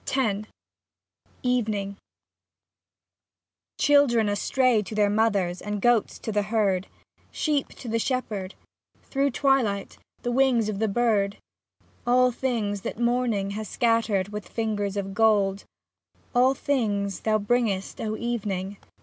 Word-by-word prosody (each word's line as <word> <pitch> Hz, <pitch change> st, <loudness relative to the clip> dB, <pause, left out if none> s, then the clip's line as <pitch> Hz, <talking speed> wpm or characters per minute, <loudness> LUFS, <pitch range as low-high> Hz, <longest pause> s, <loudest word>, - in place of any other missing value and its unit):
28 255 Hz, -7 st, +1 dB
X -, -, -28 dB, 0.9 s
EVENING 215 Hz, -6 st, -1 dB, 1.8 s
Children 255 Hz, -7 st, +4 dB
astray 240 Hz, +3 st, +2 dB
to 210 Hz, +1 st, -7 dB
their 205 Hz, -1 st, +3 dB
mothers, 205 Hz, -5 st, +1 dB
and 210 Hz, 0 st, -3 dB
goats 240 Hz, 0 st, +2 dB
to 220 Hz, -, -5 dB
the 210 Hz, 0 st, +1 dB
herd, 200 Hz, -3 st, 0 dB, 0.4 s
Sheep 295 Hz, -3 st, -1 dB
to 250 Hz, -, -10 dB
the 230 Hz, 0 st, 0 dB
shepherd, 215 Hz, -7 st, -2 dB, 0.5 s
through 275 Hz, 0 st, 0 dB
twilight 245 Hz, -7 st, 0 dB, 0.2 s
the 245 Hz, -, -1 dB
wings 245 Hz, -4 st, +3 dB
of 200 Hz, -2 st, -3 dB
the 220 Hz, -, +1 dB
bird, 210 Hz, -2 st, +1 dB, 0.7 s
All 250 Hz, +1 st, +4 dB
things 225 Hz, -5 st, -2 dB
that -, -, -5 dB
morning 235 Hz, -4 st, 0 dB
has 215 Hz, 0 st, -5 dB
scat 230 Hz, -2 st, +2 dB
tered 200 Hz, -3 st, 0 dB
with 210 Hz, -1 st, -7 dB
fingers 210 Hz, -3 st, -2 dB
of 195 Hz, -1 st, -3 dB
gold, 205 Hz, -2 st, +2 dB, 0.7 s
All 255 Hz, +2 st, +4 dB
things 205 Hz, -9 st, -1 dB
thou 215 Hz, -1 st, +1 dB
bringest, 210 Hz, -2 st, -1 dB
O 215 Hz, 0 st, -2 dB
Even 235 Hz, -3 st, -2 dB
ing 190 Hz, +2 st, -4 dB
220 Hz, 130 wpm, -26 LUFS, 200-245 Hz, 1.8 s, Children